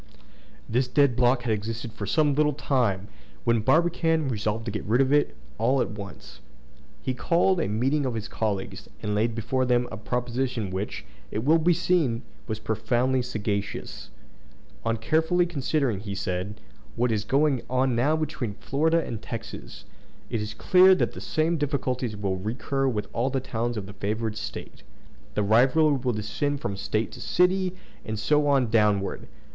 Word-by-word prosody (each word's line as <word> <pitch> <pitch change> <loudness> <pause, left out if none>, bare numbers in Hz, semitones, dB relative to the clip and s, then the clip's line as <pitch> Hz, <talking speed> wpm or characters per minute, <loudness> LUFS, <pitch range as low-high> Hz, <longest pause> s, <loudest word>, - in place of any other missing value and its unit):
This 125 +3 +1
dead 135 -1 +3
block 125 0 +3
had 115 -3 +1
existed 110 +2 -4
for 105 -3 -5
some 150 +5 +3
little 150 +1 +2
time, 120 -9 0 0.4
when 115 -1 +3
Barbicane 165 +1 +2
resolved 110 -1 -2
to 115 - -3
get 105 - -4
rid 115 +4 +2
of 135 +1 +3
it 145 - +2 0.2
all 130 +4 +3
at 125 - 0
once. 100 -3 -9 0.6
He 130 - -1
called 175 +7 +2
a - - 0
meeting 130 +7 +1
of 120 - -3
his 110 -1 -4
colleagues, 105 -4 -3
and 105 - -1
laid 110 +2 +1
before 120 +3 0
them 125 -1 +2
a 110 - -5
proposition 125 -1 -2
which, 95 +3 -4 0.2
it 105 +6 -3
will 160 +3 +5
be 170 +2 +3
seen, 165 -9 +1 0.2
was 110 -2 -2
profoundly 125 +4 0
sagacious. 105 -4 -4 0.7
"On 115 0 0
carefully 160 +9 +2
considering," 140 - 0
he 100 -1 -5
said, 95 +2 -3 0.4
"what 120 0 +1
is 105 -2 0
going 135 +2 +2
on 130 -1 +2
now 140 +7 +3
between 135 -9 -3
Florida 160 +8 +1
and 110 -2 -5
Texas, 115 -1 -8 0.5
it 115 - 0
is 105 0 -5
clear 185 +1 +6
that - - 0
the - - -9
same 165 +1 0
difficulties 130 -6 -1
will 100 -2 -1
recur 130 +7 -1
with 110 -5 -1
all 120 +3 +1
the 135 0 0
towns 120 -2 -2
of 100 - -4
the 100 - -10
favored 110 +2 -2
State. 115 - -7 0.5
The 105 - +2
rivalry 135 +8 +4
will 125 -1 0
descend 140 +7 -2
from 100 - -3
State 105 +3 -1
to - - -10
city, 185 +1 +2 0.3
and 110 0 -4
so 150 +7 +2
on 135 -5 +3
downward. 105 -3 +2
120 Hz, 170 wpm, -26 LUFS, 110-145 Hz, 0.7 s, clear